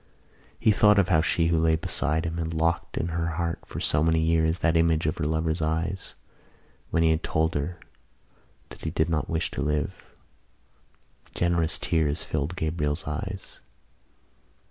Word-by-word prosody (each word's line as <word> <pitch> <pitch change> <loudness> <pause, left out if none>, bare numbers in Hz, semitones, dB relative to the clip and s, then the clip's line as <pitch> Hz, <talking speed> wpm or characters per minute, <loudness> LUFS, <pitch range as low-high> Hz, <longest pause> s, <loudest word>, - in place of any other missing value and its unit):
He 110 - +4
thought 105 0 +5
of 95 -2 +3
how 80 -4 +4
she 80 +1 +1
who 85 -1 +2
lay 80 0 +3
beside 80 0 -1
him 80 +1 -3
had 80 -1 -3
locked 80 +1 0
in 85 - -1
her 85 0 -1
heart 85 -1 -1
for - - -6
so 75 - +1
many 80 0 +3
years 80 +1 +2
that 85 -1 +1
image 80 -1 +3
of 75 - -1
her 80 - 0
lover's 80 +1 0
eyes 80 +5 -2 0.7
when 80 - +2
he 80 - +4
had 80 0 +1
told 80 +1 0
her 80 +5 -3 0.9
that - - -12
he 80 - -2
did 80 0 0
not 80 -2 -1
wish 80 0 -1
to - - -4
live. 75 +5 0 1.4
Generous 85 -2 +1
tears 80 -2 0
filled 75 +3 -2
Gabriel's 80 -2 -2
eyes. 95 +6 -5
80 Hz, 165 wpm, -26 LUFS, 80-85 Hz, 1.4 s, thought